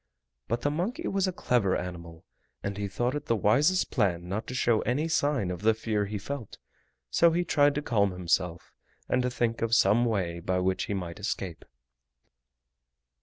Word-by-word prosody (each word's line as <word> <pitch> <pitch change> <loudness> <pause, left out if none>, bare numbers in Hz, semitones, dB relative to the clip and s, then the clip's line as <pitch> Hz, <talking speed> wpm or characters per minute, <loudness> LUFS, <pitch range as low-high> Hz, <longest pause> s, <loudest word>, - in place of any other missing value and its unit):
But 115 +1 -1
the 145 - +1
monkey 220 - -2
was 195 -1 +1
a - - 0
clever 120 - +1
animal, 85 -2 -7 0.4
and 100 0 -3
he 100 0 -3
thought 120 +6 -1
it 150 0 -5
the 115 - +2
wisest 145 - +3
plan 90 -8 0
not 100 +5 -3
to 125 - -5
show 120 -3 +2
any 140 +7 0
sign 145 - +1
of 90 - -5
the 110 +1 +3
fear 110 -2 -1
he 105 +1 -3
felt, 125 +2 -6 0.5
so 170 - +5
he 170 +2 +1
tried 145 -3 +3
to 150 - -2
calm 100 -6 +2
himself 90 -1 -1 0.3
and 125 - +2
to 125 - 0
think 120 -2 -1
of 115 0 +2
some 115 +3 +4
way 90 -7 -1
by 90 +2 -1
which 95 0 0
he 100 - -2
might 90 -2 -5
escape. 95 -4 -4
110 Hz, 185 wpm, -28 LUFS, 95-140 Hz, 0.5 s, so